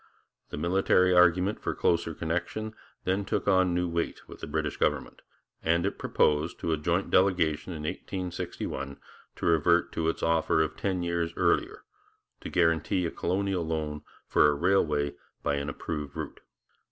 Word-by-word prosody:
The - - -6
military 90 +2 +3
argument 90 +3 +4
for - - -2
closer 85 -1 +1
connection 90 +7 -3 0.3
then 95 +2 0
took 100 - -2
on 95 -2 +4
new 90 0 +1
weight 85 0 -3
with - - -11
the - - -6
British 75 0 -2
government, - - -1 0.4
and 85 +2 +2
it 100 - -2
proposed, 75 +2 +1
to 85 - -1
a - - +1
joint 85 +5 -1
delegation 90 -4 +2
in 75 -2 -6
1861, 85 -6 -4 0.4
to - - -5
revert 85 +1 +3
to 80 0 0
its - - -3
offer 80 -1 +3
of 80 0 -4
ten 95 -3 -1
years 85 -1 -1
earlier - - +1 0.6
to - - -7
guarantee 85 +1 +2
a 85 - -2
colonial 95 0 -1
loan 80 -2 -3 0.2
for - - +4
a 75 - +2
railway 75 -4 +2 0.3
by 70 - +1
an 70 0 -3
approved 75 -3 -5
route. 80 -3 -6
85 Hz, 160 wpm, -28 LUFS, 80-90 Hz, 0.6 s, argument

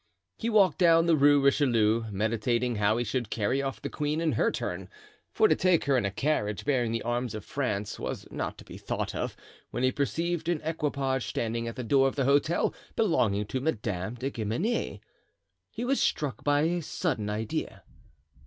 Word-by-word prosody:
He 230 - -1
walked 195 -8 +4
down 165 -2 +5
the 170 -1 +4
Rue 145 0 +5
Richelieu, 115 -5 +3
meditating 115 +3 0
how 105 +2 +2
he 120 - 0
should 120 0 -2
carry 115 +5 0
off 135 -1 -3
the - - -4
queen 150 +1 -1
in 165 -1 +1
her - - +2
turn, - - -4 0.4
for 435 - +4
to - - +3
take 180 -3 +3
her 140 - +2
in 125 - +2
a - - +1
carriage 105 -3 -1
bearing 125 -5 +1
the 115 - -2
arms 120 -1 -2
of 110 - -7
France 105 -7 -2
was - - -4
not - - -4
to - - -13
be - - -10
thought - - -3
of, - - -3 0.3
when 125 - -3
he 130 - +4
perceived 165 +4 -1
an 175 -3 +1
equipage 140 -5 -1
standing 115 0 -2
at 115 - -5
the 125 - -4
door 135 +3 +4
of 135 - -3
the 135 - 0
hotel 145 +5 +2 0.2
belonging 110 - +2
to 130 +5 -3
Madame 105 - -2
de 130 +3 -3
Guemenee. 120 - -2 0.7
He 235 - -5
was 270 +2 +1
struck 140 -7 -1
by 145 0 +3
a 170 +3 +1
sudden 145 - -2
idea. 105 +1 -3
130 Hz, 190 wpm, -28 LUFS, 115-155 Hz, 0.7 s, down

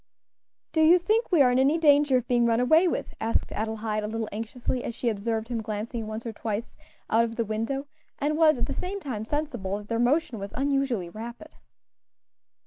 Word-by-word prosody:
"Do 315 - +2
you 325 +3 +7
think 430 +6 0
we 325 -6 +6
are 250 - +4
in 250 - +2
any 280 +5 +4
danger 290 -4 +5
of 250 - -3
being 240 -1 +3
run 230 0 +2
away 315 +8 +5
with?" - - -2
asked 225 +1 0
Adelaide, 220 0 -2
a - - -2
little 225 0 -3
anxiously 235 +3 -3
as 235 - -4
she 240 - 0
observed 220 +1 -2
him 235 -2 -2
glancing 220 +1 -4
once 220 +2 -6
or 230 - -4
twice 220 +1 -4 0.4
out 225 +1 +5
of 230 -1 -3
the 230 - -1
window, 225 +6 -2 0.3
and 295 +2 0
was 310 -2 +5
at 240 - 0
the - - -4
same 390 +2 -4
time 235 - -5
sensible 240 -9 -2
that 210 0 -11
their 230 0 0
motion 250 -1 +1
was 200 0 -7
unusually 275 -9 0
rapid. 235 - -9
235 Hz, 205 wpm, -27 LUFS, 220-285 Hz, 0.4 s, you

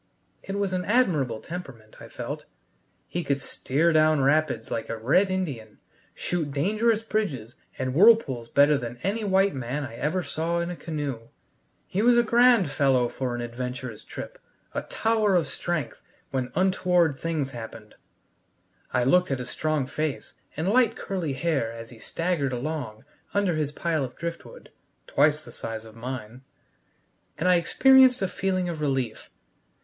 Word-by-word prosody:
It 195 +1 -5
was 200 -2 -1
an 180 0 -1
admirable 160 - +2
temperament, 135 -11 -9
I - - -10
felt: - - -6 0.6
he 175 - -3
could 140 -2 0
steer 150 +4 0
down 155 -1 +4
rapids 140 -5 +1
like 115 - -3
a 115 - -3
red 145 - +3
Indian, 140 - -3 0.4
shoot 170 -4 -2
dangerous 215 +10 +1
bridges 150 - -2 0.2
and 130 -1 -2
whirlpools 155 - +4
better 145 0 +4
than 120 -1 -6
any 205 +5 -1
white 195 0 +3
man 130 +2 -3
I 125 -5 -7
ever 155 +8 -1
saw 165 +2 -2
in 170 +1 -1
a - - -5
canoe. 145 -9 -5 0.6
He 195 - -1
was 240 +1 +5
a 240 - +5
grand 235 - +4
fellow 135 -4 +2
for 125 -2 -3
an 120 - -4
adventurous 125 0 -5
trip, - - -8 0.3
a - - -1
tower 220 -3 +1
of 170 -4 +2
strength 165 +2 -3 0.3
when 130 -2 -2
untoward 180 -4 +2
things 155 -5 -2
happened. 110 -3 -9 1.0
I 125 - +2
looked 180 +8 +4
at 135 - 0
his 125 -1 -5
strong 155 -3 0
face 150 +2 -3 0.2
and 160 +4 -1
light 235 0 +4
curly 175 -7 -3
hair 135 -5 0
as 115 0 -9
he 115 - -13
staggered 165 -2 -1
along 125 -4 -4 0.3
under 200 -3 +2
his 155 -2 -1
pile 160 -1 -1
of 125 -1 -6
driftwood 170 0 -7 0.3
(twice 150 +2 +2
the - - -11
size 115 -1 -6
of 110 0 -13
mine!), 125 0 -7 1.0
and 160 +4 0
I 180 -1 +6
experienced 260 +6 +5
a - - +2
feeling 185 -1 -1
of 165 -3 -4
relief. 135 -6 -2
155 Hz, 160 wpm, -26 LUFS, 130-185 Hz, 1.0 s, I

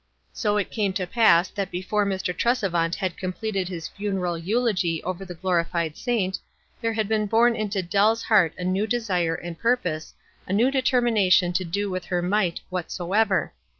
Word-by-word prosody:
So 210 0 0
it 205 - -2
came 205 -4 0
to 185 -2 -1
pass 185 -3 +4
that 200 -1 -3
before 200 +3 -1
Mr. 190 -2 -2
Tresevant 180 -7 +1
had 185 -3 -3
completed 190 0 -3
his 170 -3 -5
funeral 195 -4 -2
eulogy 185 -2 0
over 185 +1 -4
the 180 -2 -8
glorified 170 -2 -1
saint, 195 -7 -1 0.4
there 230 -1 0
had 220 -2 -1
been 215 -1 0
born 230 +3 +4
into 205 -3 -2
Dell's 205 +6 +2
heart 195 -8 +3
a 180 - -5
new 190 +4 0
desire 185 -8 0
and 175 -1 -7
purpose, 180 -10 -1 0.3
a 185 - -2
new 235 +6 +3
determination 225 -9 +3
to 180 +1 0
do 200 +3 -2
with 185 -1 -4
her 175 -1 -1
might 185 -2 0
"Whatsoever." 190 +3 0
190 Hz, 170 wpm, -24 LUFS, 180-215 Hz, 0.4 s, pass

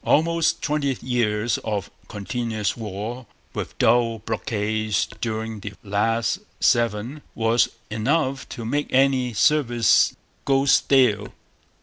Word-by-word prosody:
Almost 165 +2 +2
twenty 145 -4 0
years 120 -3 0
of 105 -3 -4 0.2
continuous 105 0 -3
war, 110 +3 -6 0.3
with - - -5
dull 115 0 +3
blockades 110 -1 -1 0.2
during 110 -1 -3
the 100 0 -7
last 115 - 0 0.2
seven, 120 +4 +1
was 115 +1 +2 0.2
enough 135 +5 0
to 115 - -7
make 145 +6 -1
any 130 -2 +3
service 120 -1 +3 0.3
'go 135 0 +2
stale.' 125 -7 +4
115 Hz, 105 wpm, -23 LUFS, 105-135 Hz, 0.3 s, stale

